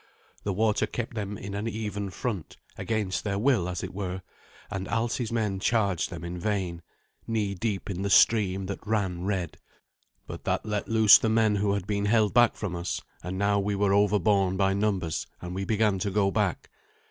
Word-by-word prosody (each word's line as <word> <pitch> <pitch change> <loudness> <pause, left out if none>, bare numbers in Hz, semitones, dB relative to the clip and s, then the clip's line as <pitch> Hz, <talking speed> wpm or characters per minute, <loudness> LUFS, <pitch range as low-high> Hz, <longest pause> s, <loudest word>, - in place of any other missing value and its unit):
The 100 - -1
water 105 +2 +1
kept 120 0 -4
them 105 -2 -4
in 100 0 -7
an 100 +3 -3
even 105 -3 -3
front, 100 -4 -4 0.2
against 105 -4 -2
their 100 -2 -1
will, 105 -6 +2
as 90 -2 -4
it - - -6
were; 95 -1 -4 0.5
and 95 -2 -4
Alsi's 115 0 -1
men 105 -4 -1
charged 100 -5 +1
them - - -7
in 85 +1 -5
vain, 90 -3 -2 0.5
knee 105 -3 -1
deep 100 0 -3
in 95 -2 -4
the 100 - -1
stream 95 -3 +4
that 100 +2 -6
ran 95 -5 -1
red. 95 -5 -2 0.7
But - - -8
that - - 0
let 105 -1 -2
loose 110 -2 +7
the 110 - 0
men 110 -2 +3
who 100 0 +1
had 100 -3 -2
been 100 0 -1
held 110 -1 +3
back 120 -1 +5
from 100 -5 -4
us; 85 +1 -3 0.2
and 90 +2 -5
now 100 +1 +2
we 100 +1 -1
were 100 0 +2
overborne 100 -2 +3
by 95 0 +2
numbers, 100 -5 -1
and 90 0 -6
we 95 +1 -3
began 105 -2 +1
to 100 - -1
go 100 0 +2
back. - - -1
100 Hz, 195 wpm, -27 LUFS, 95-110 Hz, 0.7 s, loose